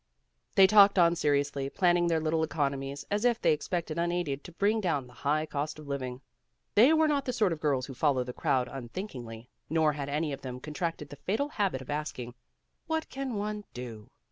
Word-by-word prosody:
They 195 Hz, -3 st, +8 dB
talked 200 Hz, 0 st, +7 dB
on 170 Hz, -1 st, +5 dB
seriously, 145 Hz, -3 st, 0 dB
planning 175 Hz, +1 st, +3 dB
their 165 Hz, -1 st, +2 dB
little 160 Hz, +1 st, 0 dB
economies 140 Hz, -3 st, -2 dB
as 205 Hz, +2 st, 0 dB
if 240 Hz, -1 st, +3 dB
they -, -, +4 dB
expected 165 Hz, +1 st, -3 dB
unaided 170 Hz, -5 st, -1 dB
to -, -, -9 dB
bring 205 Hz, +5 st, +1 dB
down 160 Hz, -9 st, 0 dB
the 125 Hz, -, -16 dB
high 150 Hz, +4 st, 0 dB
cost 150 Hz, 0 st, -3 dB
of 155 Hz, -1 st, -11 dB
living. 130 Hz, -2 st, -4 dB, 0.5 s
They 240 Hz, +8 st, +7 dB
were 320 Hz, 0 st, +4 dB
not 285 Hz, -2 st, +1 dB
the 250 Hz, -, 0 dB
sort 210 Hz, -7 st, +2 dB
of 160 Hz, -, -6 dB
girls 135 Hz, -4 st, +1 dB
who 135 Hz, -, -8 dB
follow 130 Hz, -1 st, +2 dB
the 125 Hz, 0 st, -7 dB
crowd 125 Hz, 0 st, +1 dB
un 125 Hz, -2 st, -7 dB
thinkingly, 120 Hz, -, -7 dB, 0.2 s
nor 160 Hz, -1 st, +3 dB
had 140 Hz, -1 st, -4 dB
any 150 Hz, +1 st, -1 dB
of 135 Hz, -, -7 dB
them 125 Hz, -1 st, -6 dB
contracted 150 Hz, +1 st, -4 dB
the 145 Hz, -, -10 dB
fatal 270 Hz, +10 st, -1 dB
habit 195 Hz, -, -1 dB
of 130 Hz, -, -7 dB
asking, 145 Hz, -5 st, -4 dB, 0.5 s
"What 320 Hz, -1 st, -1 dB
can 265 Hz, -3 st, -3 dB
one 210 Hz, 0 st, -3 dB
do?" 115 Hz, -4 st, -8 dB
155 Hz, 205 wpm, -29 LUFS, 135-195 Hz, 0.5 s, They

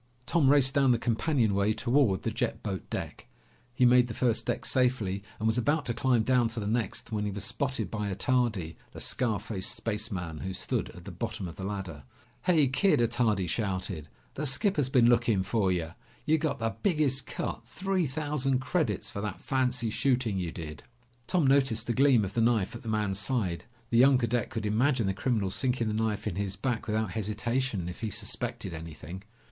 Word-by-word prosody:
Tom 155 Hz, -2 st, +3 dB
raced 135 Hz, -2 st, +5 dB
down 135 Hz, -3 st, +4 dB
the 120 Hz, -, +4 dB
companionway 110 Hz, -4 st, +1 dB
toward 120 Hz, -5 st, +2 dB
the -, -, -1 dB
jet -, -, -2 dB
boat -, -, -4 dB
deck. -, -, -5 dB, 0.4 s
He 125 Hz, +1 st, +3 dB
made 125 Hz, 0 st, +6 dB
the 115 Hz, -, -6 dB
first 120 Hz, -3 st, +1 dB
deck -, -, -1 dB
safely 120 Hz, -7 st, +1 dB, 0.2 s
and 110 Hz, -, -4 dB
was 110 Hz, +2 st, +2 dB
about 145 Hz, +4 st, +1 dB
to 120 Hz, -, -1 dB
climb 125 Hz, -3 st, +2 dB
down 125 Hz, 0 st, +3 dB
to 115 Hz, 0 st, -4 dB
the 105 Hz, -, -3 dB
next 110 Hz, 0 st, -2 dB
when 105 Hz, -1 st, -1 dB
he 105 Hz, -, -1 dB
was 100 Hz, 0 st, -4 dB
spotted 130 Hz, -6 st, -2 dB
by 105 Hz, -2 st, -2 dB
Attardi, 110 Hz, -6 st, 0 dB, 0.2 s
the -, -, -8 dB
scar 115 Hz, -5 st, 0 dB
faced 105 Hz, -3 st, -2 dB
spaceman, 100 Hz, -7 st, -3 dB
who 95 Hz, 0 st, -4 dB
stood -, -, -2 dB
at 90 Hz, -, -12 dB
the 100 Hz, -, -6 dB
bottom 105 Hz, +1 st, -4 dB
of 85 Hz, -, -8 dB
the 95 Hz, -, -7 dB
ladder. 95 Hz, -6 st, -5 dB, 0.4 s
"Hey, 160 Hz, -6 st, +4 dB
Kid!" 160 Hz, +8 st, +3 dB
Attardi 115 Hz, -4 st, +2 dB
shouted. 95 Hz, -5 st, -2 dB, 0.3 s
"The 150 Hz, +2 st, -2 dB
skipper's 145 Hz, -, +1 dB
been 125 Hz, -3 st, +5 dB
looking 115 Hz, -5 st, +3 dB
for 100 Hz, -2 st, +1 dB
ya. 85 Hz, -3 st, -1 dB, 0.3 s
You 160 Hz, +1 st, +3 dB
got 145 Hz, -3 st, -1 dB
the 115 Hz, -3 st, -2 dB
biggest 150 Hz, -8 st, +1 dB
cut. -, -, -4 dB
Three 190 Hz, -3 st, -1 dB
thousand 140 Hz, -1 st, -1 dB
credits 130 Hz, -, -1 dB
for 100 Hz, -, -4 dB
that 105 Hz, -3 st, -4 dB
fancy 125 Hz, -3 st, 0 dB
shooting 125 Hz, -6 st, +1 dB
you 85 Hz, -3 st, -2 dB
did!" 75 Hz, -3 st, -7 dB, 0.5 s
Tom 180 Hz, -5 st, +2 dB
noticed 135 Hz, -5 st, +3 dB
the 120 Hz, -, 0 dB
gleam 130 Hz, -4 st, +4 dB
of 95 Hz, -, -6 dB
the 115 Hz, -, +1 dB
knife 115 Hz, -4 st, +2 dB
at 120 Hz, -, -8 dB
the 115 Hz, -, -6 dB
man's 105 Hz, -3 st, 0 dB
side. 100 Hz, -7 st, -1 dB, 0.3 s
The 115 Hz, -, +4 dB
young 135 Hz, +1 st, +7 dB
cadet 120 Hz, -2 st, 0 dB
could 110 Hz, -2 st, -4 dB
imagine 120 Hz, +3 st, +2 dB
the 95 Hz, -, +1 dB
criminal 100 Hz, -2 st, 0 dB
sinking 125 Hz, -1 st, 0 dB
the -, -, -1 dB
knife 110 Hz, -1 st, -1 dB
in 85 Hz, -, -3 dB
his 100 Hz, -1 st, -2 dB
back 125 Hz, -1 st, -2 dB
without 110 Hz, -2 st, 0 dB
hesitation, 110 Hz, -1 st, -2 dB
if 90 Hz, -, -7 dB
he 110 Hz, -1 st, -2 dB
suspected 115 Hz, -1 st, -3 dB
anything. 80 Hz, +2 st, -8 dB
115 Hz, 195 wpm, -29 LUFS, 100-130 Hz, 0.5 s, young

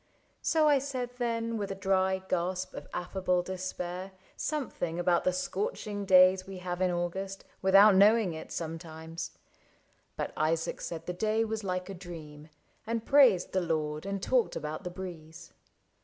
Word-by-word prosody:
So 315 Hz, -1 st, +3 dB
I 290 Hz, -2 st, +5 dB
said 255 Hz, -3 st, -4 dB
then 230 Hz, -1 st, -1 dB
With 200 Hz, -, -3 dB
a 195 Hz, -, -3 dB
dry 190 Hz, -1 st, +1 dB
gasp 185 Hz, +1 st, -1 dB
of -, -, -8 dB
affable 180 Hz, 0 st, -1 dB
despair, 185 Hz, 0 st, -5 dB, 0.2 s
Something 250 Hz, -, -3 dB
about 175 Hz, 0 st, +2 dB
the 185 Hz, -, +4 dB
scorching 205 Hz, -, -3 dB
days 185 Hz, 0 st, +6 dB
we 195 Hz, -1 st, -7 dB
have 180 Hz, 0 st, -4 dB
In 185 Hz, -, +3 dB
August 185 Hz, +3 st, -3 dB, 0.2 s
without 195 Hz, +2 st, +7 dB
knowing 205 Hz, -1 st, +5 dB
it 160 Hz, -, -8 dB
sometimes; 165 Hz, 0 st, -6 dB, 0.8 s
But -, -, -3 dB
Isaac 160 Hz, +1 st, 0 dB
said 165 Hz, -1 st, -5 dB
the 180 Hz, -, -3 dB
day 215 Hz, +4 st, +1 dB
was 220 Hz, -1 st, -3 dB
like 185 Hz, -1 st, -2 dB
a 195 Hz, -, -6 dB
dream. 160 Hz, -4 st, -10 dB, 0.4 s
And 230 Hz, 0 st, -2 dB
praised 255 Hz, -11 st, +5 dB
the 190 Hz, -, +1 dB
Lord, 155 Hz, 0 st, -2 dB
and 195 Hz, -1 st, -3 dB
talked 250 Hz, -3 st, +2 dB
about 155 Hz, +4 st, -4 dB
the 180 Hz, -, -4 dB
breeze. 170 Hz, -3 st, -9 dB
185 Hz, 155 wpm, -30 LUFS, 175-205 Hz, 0.8 s, without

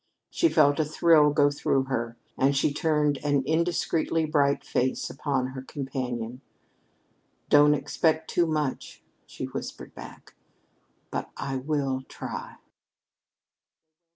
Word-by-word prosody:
She 335 Hz, -, +3 dB
felt 145 Hz, -, +4 dB
a -, -, +4 dB
thrill 155 Hz, 0 st, +4 dB
go 145 Hz, 0 st, +3 dB
through 140 Hz, -1 st, +1 dB
her, 120 Hz, -3 st, -3 dB, 0.2 s
and 135 Hz, +1 st, +2 dB
she 140 Hz, +1 st, +2 dB
turned 150 Hz, -3 st, +1 dB
an 145 Hz, -2 st, +2 dB
indiscreetly 165 Hz, 0 st, 0 dB
bright 145 Hz, -2 st, +1 dB
face 130 Hz, +1 st, -1 dB
upon 130 Hz, -2 st, -1 dB
her 130 Hz, 0 st, -7 dB
companion. 125 Hz, -3 st, -5 dB, 1.1 s
"Don't 150 Hz, 0 st, +6 dB
expect 160 Hz, +1 st, 0 dB
too 175 Hz, -1 st, +1 dB
much," 150 Hz, -4 st, -3 dB, 0.2 s
she -, -, -6 dB
whispered -, -, -7 dB
back, -, -, -12 dB, 0.8 s
"but -, -, -3 dB
I 135 Hz, -1 st, -3 dB
will 135 Hz, -1 st, -1 dB
try." -, -, -7 dB
145 Hz, 120 wpm, -27 LUFS, 135-155 Hz, 1.1 s, Don't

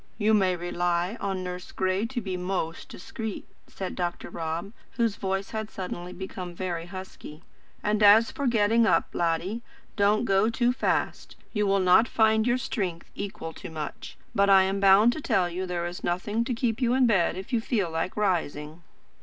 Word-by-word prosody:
"You 215 Hz, 0 st, +2 dB
may 190 Hz, -3 st, +3 dB
rely 175 Hz, +2 st, -1 dB
on 190 Hz, -2 st, -2 dB
Nurse 180 Hz, 0 st, -6 dB
Gray 190 Hz, +3 st, 0 dB
to 245 Hz, 0 st, -4 dB
be 190 Hz, -3 st, -4 dB
most 180 Hz, -2 st, -3 dB
discreet," 220 Hz, +3 st, -6 dB, 0.2 s
said 190 Hz, -2 st, -6 dB
Dr. 175 Hz, -1 st, -4 dB
Rob; 165 Hz, +5 st, -4 dB, 0.2 s
whose 230 Hz, -4 st, 0 dB
voice 195 Hz, 0 st, -3 dB
had 220 Hz, -1 st, -4 dB
suddenly 180 Hz, -2 st, -6 dB
become 180 Hz, -1 st, -7 dB
very 170 Hz, -2 st, -4 dB
husky. 185 Hz, -4 st, -9 dB, 0.4 s
"And 210 Hz, 0 st, +1 dB
as 210 Hz, +2 st, +7 dB
for 280 Hz, -, -2 dB
getting 225 Hz, 0 st, +3 dB
up, -, -, +2 dB
laddie, 175 Hz, +6 st, -1 dB, 0.3 s
don't 210 Hz, +3 st, +3 dB
go 195 Hz, +1 st, +3 dB
too 240 Hz, +1 st, +1 dB
fast. 255 Hz, -, -1 dB, 0.2 s
You 210 Hz, -2 st, +1 dB
will 195 Hz, 0 st, +3 dB
not 185 Hz, +5 st, +5 dB
find 220 Hz, 0 st, +3 dB
your 240 Hz, +1 st, +3 dB
strength 190 Hz, -9 st, -4 dB
equal 195 Hz, -5 st, -6 dB
to -, -, -9 dB
much. 155 Hz, -2 st, -7 dB, 0.2 s
But 200 Hz, -3 st, +3 dB
I 195 Hz, -1 st, +7 dB
am 195 Hz, +1 st, -1 dB
bound 200 Hz, +4 st, +6 dB
to 310 Hz, -, -6 dB
tell 185 Hz, -9 st, +2 dB
you 180 Hz, +2 st, -4 dB
there 175 Hz, -1 st, -2 dB
is 175 Hz, +1 st, -6 dB
nothing 205 Hz, +6 st, -1 dB
to 250 Hz, -, -1 dB
keep 235 Hz, 0 st, -1 dB
you 245 Hz, 0 st, +2 dB
in 260 Hz, -1 st, +4 dB
bed 190 Hz, -6 st, +2 dB
if 190 Hz, +7 st, -8 dB
you 230 Hz, -, +2 dB
feel 205 Hz, -7 st, -1 dB
like 165 Hz, +4 st, -3 dB
rising." 165 Hz, -5 st, -1 dB
195 Hz, 185 wpm, -27 LUFS, 175-220 Hz, 0.4 s, as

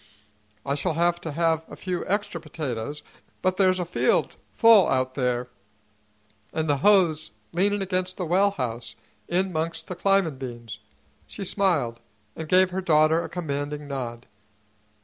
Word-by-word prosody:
I 140 Hz, -, 0 dB
shall 150 Hz, +3 st, -1 dB
have 175 Hz, +1 st, +1 dB
to 160 Hz, -, -5 dB
have 160 Hz, +1 st, +1 dB
a -, -, -9 dB
few 180 Hz, -2 st, -3 dB
extra 200 Hz, -4 st, -1 dB
potatoes, 145 Hz, -4 st, -5 dB, 0.4 s
but 185 Hz, 0 st, +1 dB
there's 185 Hz, -1 st, +3 dB
a 180 Hz, -, -1 dB
field 170 Hz, -, +1 dB, 0.2 s
full 225 Hz, -6 st, +6 dB
out 130 Hz, 0 st, 0 dB
there, 125 Hz, -2 st, -1 dB, 1.0 s
an' 160 Hz, -, -1 dB
the 145 Hz, -2 st, +1 dB
hoe's 160 Hz, -, +3 dB, 0.2 s
leanin' 200 Hz, +3 st, +1 dB
against 185 Hz, -1 st, -1 dB
the 180 Hz, -, -2 dB
well 190 Hz, +5 st, +3 dB
house, 120 Hz, -, -5 dB, 0.3 s
in 185 Hz, +1 st, 0 dB
'mongst 165 Hz, +1 st, -2 dB
the 180 Hz, -, -6 dB
climbin' 185 Hz, -6 st, +2 dB
beans." 120 Hz, -5 st, -7 dB, 0.5 s
She 200 Hz, -, -7 dB
smiled 165 Hz, -, +1 dB, 0.4 s
and 160 Hz, -1 st, -7 dB
gave 185 Hz, 0 st, +5 dB
her 190 Hz, +1 st, -2 dB
daughter 160 Hz, -1 st, +3 dB
a -, -, -6 dB
commanding 145 Hz, -3 st, -4 dB
nod. 125 Hz, -4 st, -5 dB
165 Hz, 150 wpm, -25 LUFS, 140-185 Hz, 1.0 s, full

